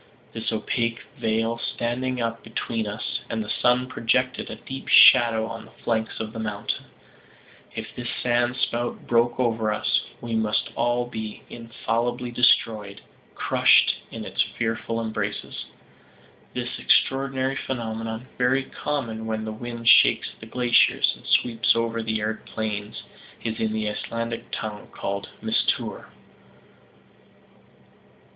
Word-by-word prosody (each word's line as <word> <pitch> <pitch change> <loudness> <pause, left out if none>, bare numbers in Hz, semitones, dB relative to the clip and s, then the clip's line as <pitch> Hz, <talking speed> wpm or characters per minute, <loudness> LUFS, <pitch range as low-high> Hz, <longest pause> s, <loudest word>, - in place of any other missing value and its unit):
This 115 0 -3
opaque 115 +1 -1 0.2
veil 115 +1 0
standing 125 +2 -2
up 115 -1 -2
between 115 0 -3
us 105 +1 -4
and 110 -1 -2
the - - -4
sun 125 +1 +4
projected 125 +1 0
a - - -5
deep 135 0 -8
shadow 115 -3 +7
on 115 0 -7
the 110 - -17
flanks 110 -1 -1
of 110 0 -4
the 115 - -5
mountain. 105 -2 -3 0.9
If - - -6
this 120 -1 -5
sand 120 0 +1
spout 120 -1 -2
broke 120 +1 +2
over 115 -3 +1
us, 105 - +1 0.2
we 120 -1 -5
must 110 -1 0
all 120 +1 +1
be 110 -3 -6
infallibly 120 +1 -2
destroyed, 110 -4 +2 0.3
crushed - - +4
in - - -7
its - - 0
fearful 115 0 -1
embraces. 110 -2 -3 0.9
This - - -3
extraordinary 135 0 +2
phenomenon, 115 -2 -4
very 130 +2 +3
common 115 -6 -3
when 110 0 -2
the 110 - -3
wind 115 +1 -6
shakes 125 - +6
the 110 - -10
glaciers, 120 0 +3
and - - -15
sweeps 115 -2 +3
over 115 0 0
the 110 -1 -1
arid 110 +1 -2
plains, 105 -1 -4 0.4
is 115 -1 -3
in 110 -1 0
the 110 -1 -1
Icelandic 115 +2 -4
tongue 105 -1 -5
called 100 0 -4
"mistour." - - -1
115 Hz, 130 wpm, -25 LUFS, 110-120 Hz, 0.9 s, shadow